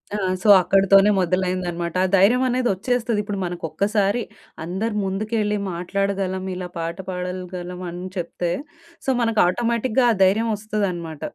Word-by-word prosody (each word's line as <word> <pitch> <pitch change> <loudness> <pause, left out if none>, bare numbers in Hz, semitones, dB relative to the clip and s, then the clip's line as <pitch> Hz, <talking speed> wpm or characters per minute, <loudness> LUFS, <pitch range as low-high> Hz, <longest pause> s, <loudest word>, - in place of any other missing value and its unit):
ఆ! - - 0 0.3
సో, - - 0
అక్కడతోనే 195 +2 +5
మొదలైందనమాట. 180 -1 -1
ఆ - - +1
ధైర్యమనేదొచ్చేస్తది. 240 0 +2
ఇప్పుడు 200 -1 -4
మనకొక్కసారి 200 +6 0 0.4
అందరు 200 +6 -3
ముందుకెళ్ళి 210 +2 -1 0.2
మాట్లాడగలం, 190 +1 -2
ఇలా 180 0 -5
పాట 165 +1 -3
పాడలగలం 180 0 -5
అని 180 +2 -6
చెప్తే, 170 0 -3 0.5
సో, - - -1
మనకు 225 -2 +1
ఆటోమేటిక్‌గా 235 +4 +1
ఆ - - -3
ధైర్యం 220 +5 +3
వస్తదనమాట. 185 -7 -3
195 Hz, 115 wpm, -22 LUFS, 180-215 Hz, 0.5 s, అక్కడతోనే